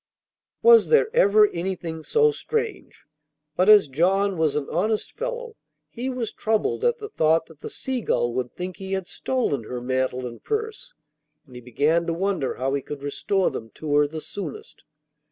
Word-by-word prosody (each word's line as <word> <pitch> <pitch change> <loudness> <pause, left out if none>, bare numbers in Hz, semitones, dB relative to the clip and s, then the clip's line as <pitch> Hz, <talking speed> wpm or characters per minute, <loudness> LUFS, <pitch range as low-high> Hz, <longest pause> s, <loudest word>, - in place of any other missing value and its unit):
Was 465 -1 +7
there 460 0 +3
ever 210 - +6
anything 170 -2 -4
so 450 - +3
strange? 450 -2 -4 0.5
But 185 +3 +3
as 210 -7 +8
John 190 +8 +1
was 160 -3 +1
an 150 -2 -2
honest 210 +6 -1
fellow, - - -5 0.4
he 250 +2 -4
was 250 -3 -4
troubled 220 - -1
at 480 0 +2
the 425 -2 -7
thought 160 - +2
that 160 -3 -18
the - - -7
Seagull 240 - -1
would 125 -1 -2
think 180 0 -5
he 195 -1 -5
had 190 -1 -2
stolen 175 - -2
her 125 +2 -5
mantle 130 0 -1
and 120 -1 -8
purse. 445 +3 -4 0.5
And 130 - -18
he 125 - -9
began 150 +8 +1
to 165 - 0
wonder 185 -6 -1
how 135 +2 -2
he 140 - 0
could 140 +1 -8
restore 190 +7 0
them 115 - -7
to 155 -2 -4
her 145 0 +4
the 155 +2 -6
soonest. 180 -5 -8
185 Hz, 175 wpm, -24 LUFS, -, 0.5 s, as